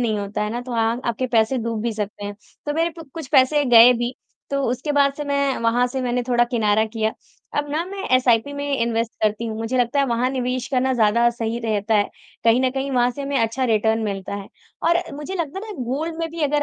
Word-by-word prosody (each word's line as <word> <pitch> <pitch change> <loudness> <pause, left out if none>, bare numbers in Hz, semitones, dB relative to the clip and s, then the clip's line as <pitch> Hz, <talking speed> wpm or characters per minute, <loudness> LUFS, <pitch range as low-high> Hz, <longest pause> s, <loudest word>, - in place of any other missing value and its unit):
नहीं 220 -3 0
होता 205 +1 -3
है 210 - -2
ना, 240 - -3
तो 245 0 -7
अ, 230 - -1 0.3
आपके 255 +2 -1
पैसे 235 +2 +2
डूब 225 -1 -2
भी 235 - -1
सकते 210 -1 -5
हैं, 205 0 -5 0.3
तो 295 - 0
मेरे 330 +2 +1
प 320 - -10
कुछ 320 -5 -6
पैसे 285 +2 +4
गए 240 0 +8
भी, 240 +1 -2 0.4
तो 275 0 0
उसके 255 +4 -2
बाद 280 -1 +3
से 295 - -4
मैं 280 -1 0
वहाँ 240 +2 +3
से 260 +1 -4
मैंने 245 0 0
थोड़ा 240 -1 +4
किनारा 220 -2 +2
किया। 220 0 -2 0.5
अब 290 0 -1
ना, 310 +3 -1
मैं 390 0 -6
एसआइपी 250 +1 +2
में 285 0 -4 0.2
इन्वेस्ट 230 0 0
करती 215 +2 +1
हूँ, 220 - -4
मुझे 225 +3 -1
लगता 245 +3 +1
है, - - +3
वहाँ 240 0 +1
निवेश 255 -1 -2
करना 260 0 +1
ज़्यादा 235 +1 +4
सही 230 0 -3
रहता 220 -1 0
है। 205 -1 +3 0.4
कहीं 230 +2 +5
न 260 0 +2
कहीं, 270 +1 -3
वहाँ 245 -1 +2
से 280 +3 -6
हमें 275 0 -1
अच्छा 230 +4 0
रिटर्न 220 -1 +2
मिलता 195 -1 -4
है। 200 -1 -7 0.4
और 340 - +4 0.2
मुझे 300 +6 -6
लगता 335 0 -3
है 420 - -6
ना, 260 - -5
गोल्ड 300 +7 -2
में 330 - -2
भी 330 0 -7
अगर 295 0 +1
245 Hz, 240 wpm, -22 LUFS, 225-275 Hz, 0.5 s, गए